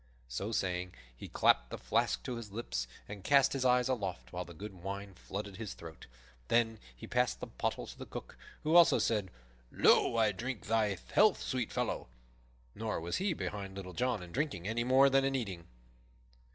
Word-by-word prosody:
So 80 - -3
saying, 90 -3 -1 0.2
he - - -9
clapped - - +3
the - - -5
flask 60 -1 0
to 120 - -4
his 110 -3 -8
lips 100 - -3 0.2
and 100 -2 -8
cast 140 +2 +5
his 135 -2 -1
eyes 125 -1 +4
aloft, 95 - -3
while - - -2
the 85 - -11
good 100 +3 -7
wine 100 +2 -6
flooded 100 +2 -6
his 105 -4 -5
throat. 80 -1 -11 0.4
Then 115 -2 +2 0.2
he - - -9
passed - - +1
the - - -4
pottle - - -3
to - - -11
the - - -7
Cook, - - -8 0.3
who 155 +2 +2
also 175 -1 +8
said, 105 -5 +1 0.4
"Lo, 115 - +4
I 110 -2 +4
drink 120 +4 -5
thy 110 -3 +1 0.2
health, 210 -1 +5
sweet 125 -4 -2
fellow!" - - -2 0.7
Nor 110 0 -2
was 85 +1 -2
he 190 -1 +1
behind 100 -9 -5
Little 95 -2 -7
John 120 -4 0
in 90 - -11
drinking 135 - -2
any 115 +2 0
more 130 +3 +6
than 135 0 +4
in 135 0 +1
eating. 95 -9 -4
105 Hz, 190 wpm, -33 LUFS, 95-125 Hz, 0.7 s, also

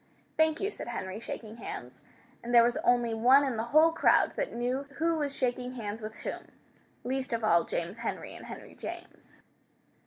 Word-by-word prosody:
"Thank 315 0 +3
you," 400 +2 -1
said - - -8
Henry, 195 -4 -4
shaking 225 -1 -7
hands. 125 - -8 0.4
And 240 - -5
there 235 - +9
was 240 +1 +2
only 240 -2 +2
one 250 +5 +6
in 265 -4 -1
the 225 +1 -2
whole 310 +6 +5
crowd - - +4
that - - -2
knew 250 +4 -2
who 330 +2 +1
was 285 -2 -2
shaking 250 -1 -1
hands 215 -2 -5
with 215 +1 -6
whom, - - -6 0.6
least 260 0 -2
of 230 -1 -1
all 170 -6 +4
James 170 +5 -3
Henry 230 - -4
and - - -10
Henry - - -9
James. - - -9
240 Hz, 185 wpm, -30 LUFS, 220-275 Hz, 0.6 s, there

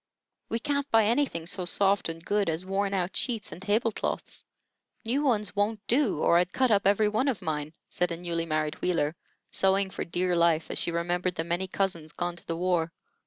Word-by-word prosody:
"We 230 - 0
can't 280 +3 -1
buy 225 -3 +5
anything 230 - +1
so 180 +1 -3
soft 195 +1 +2
and 165 +1 -7
good 205 -3 +1
as 165 +3 -2
worn 195 +1 0
out 185 -1 -1
sheets 230 -5 -1
and - - -9
table 215 +4 +1
cloths. - - -3 0.6
New 255 +6 +1
ones 215 -7 +1
wont 210 +2 +1
do, 245 - +2
or 170 - +5
I'd 180 +1 0
cut 260 +2 +2
up 200 -2 +4
every 205 +2 +4
one 220 +6 +1
of 255 -7 0
mine," 155 -2 -3
said 180 0 -1
a 170 - -3
newly 170 -1 -3
married 155 -1 -1
Wheeler, 165 -3 +1 0.4
sewing 195 0 +2
for - - -3
dear 180 +1 0
life, 170 -2 +2
as - - -3
she - - +1
remembered 175 +2 -1
the 160 - -1
many 175 +3 -2
cousins 175 -5 -2
gone 175 0 -2
to - - -13
the 165 - -2
war. 175 -2 +1
185 Hz, 210 wpm, -28 LUFS, 170-210 Hz, 0.6 s, buy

